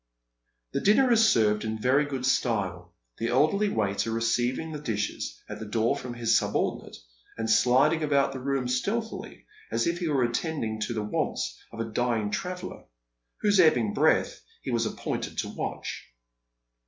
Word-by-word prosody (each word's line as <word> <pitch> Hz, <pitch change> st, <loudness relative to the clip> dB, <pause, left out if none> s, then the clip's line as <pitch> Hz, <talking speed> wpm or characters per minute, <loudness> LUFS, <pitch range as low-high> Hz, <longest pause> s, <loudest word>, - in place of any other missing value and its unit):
The -, -, -1 dB
dinner 245 Hz, +5 st, +4 dB
is 225 Hz, -1 st, +6 dB
served 105 Hz, -, +3 dB
in 110 Hz, 0 st, -3 dB
very 130 Hz, +6 st, +3 dB
good 135 Hz, -3 st, -4 dB
style, 95 Hz, -9 st, -1 dB, 0.2 s
the 115 Hz, -, -1 dB
elderly 155 Hz, -, +2 dB
waiter 105 Hz, -, 0 dB
receiving 120 Hz, +6 st, 0 dB
the 150 Hz, -, -5 dB
dishes 105 Hz, -, -3 dB
at -, -, -7 dB
the 110 Hz, -, -6 dB
door 110 Hz, +2 st, +1 dB
from 125 Hz, -1 st, -6 dB
his 115 Hz, -1 st, +2 dB
subordinate, -, -, -1 dB, 0.4 s
and 115 Hz, 0 st, -2 dB
sliding 130 Hz, +8 st, +4 dB
about 140 Hz, -2 st, +2 dB
the 130 Hz, -, -5 dB
room 135 Hz, -1 st, -1 dB
stealthily, 205 Hz, -, -3 dB, 0.3 s
as -, -, +1 dB
if 170 Hz, +1 st, 0 dB
he 175 Hz, -, -2 dB
were 140 Hz, -4 st, +2 dB
attending 120 Hz, -2 st, -2 dB
to 120 Hz, -, -4 dB
the 110 Hz, -, -1 dB
wants -, -, -2 dB, 0.2 s
of 115 Hz, -, -10 dB
a 115 Hz, -, -1 dB
dying 110 Hz, -2 st, -1 dB
traveller, 180 Hz, +7 st, -5 dB, 0.6 s
whose 205 Hz, -2 st, +3 dB
ebbing 125 Hz, -, +4 dB
breath -, -, +2 dB, 0.2 s
he -, -, -3 dB
was 115 Hz, -2 st, +1 dB
appointed -, -, -4 dB
to -, -, -2 dB
watch. -, -, -5 dB
125 Hz, 165 wpm, -27 LUFS, 110-150 Hz, 0.6 s, is